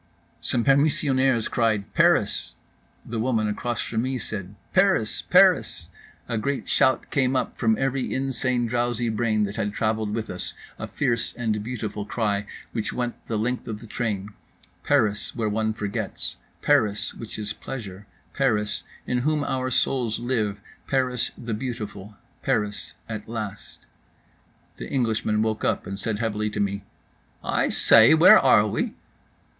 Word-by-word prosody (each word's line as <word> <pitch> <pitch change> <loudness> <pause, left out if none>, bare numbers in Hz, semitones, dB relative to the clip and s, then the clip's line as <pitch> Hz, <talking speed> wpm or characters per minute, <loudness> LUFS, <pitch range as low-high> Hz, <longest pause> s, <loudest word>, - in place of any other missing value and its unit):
Some 120 - 0
permissionaires 135 -4 +3
cried 110 -4 0
"Paris." - - +2 0.5
The 115 -1 -4
woman 115 -2 +1
across 120 +3 -2
from 110 -1 -2
me 130 +1 -1
said 100 -4 -5 0.2
"Paris, 185 - +3
Paris." - - +4 0.4
A 115 -3 -1
great 140 +4 -2
shout 130 - +2
came 130 -1 +2
up - - -1
from 110 -2 +3
every 135 -1 -1
insane 130 -2 0
drowsy 120 0 0
brain 110 -1 +1
that 100 0 -3
had 105 0 -1
travelled 110 -1 0
with 110 -1 -3
us—a 90 - -7
fierce 120 -5 -1
and 110 -3 -1
beautiful 110 -3 -4
cry, 105 -2 -1 0.2
which 110 -3 -2
went 120 -1 -4
the 110 - -1
length 125 +4 -2
of 110 -2 -4
the 115 - -11
train…. 105 -3 -3 0.5
Paris, 110 -8 +1
where 115 -3 -1
one 110 +1 0
forgets, 105 -2 -3 0.3
Paris, 105 -1 +2
which 115 - -8
is 105 0 -3
Pleasure, 105 -6 -8 0.3
Paris, 105 -7 +1 0.2
in 125 - 0
whom 150 +3 +1
our 130 -2 -1
souls 120 -2 +1
live, 110 -4 -1 0.3
Paris, 130 -3 +1
the 115 -2 -4
beautiful, 105 -4 -5 0.3
Paris 105 -1 -1
at 110 -1 -6
last. 105 -3 -6 0.9
The - - -7
Englishman 110 -4 +1
woke 110 -1 -1
up - - 0
and 95 0 -5
said 105 0 -2
heavily 105 -1 -1
to 105 - -5
me: 100 0 -1 0.6
"I - - +1
say, - - +7
where - - +9
are - - +5
we?" - - -2
110 Hz, 145 wpm, -25 LUFS, 105-125 Hz, 0.9 s, where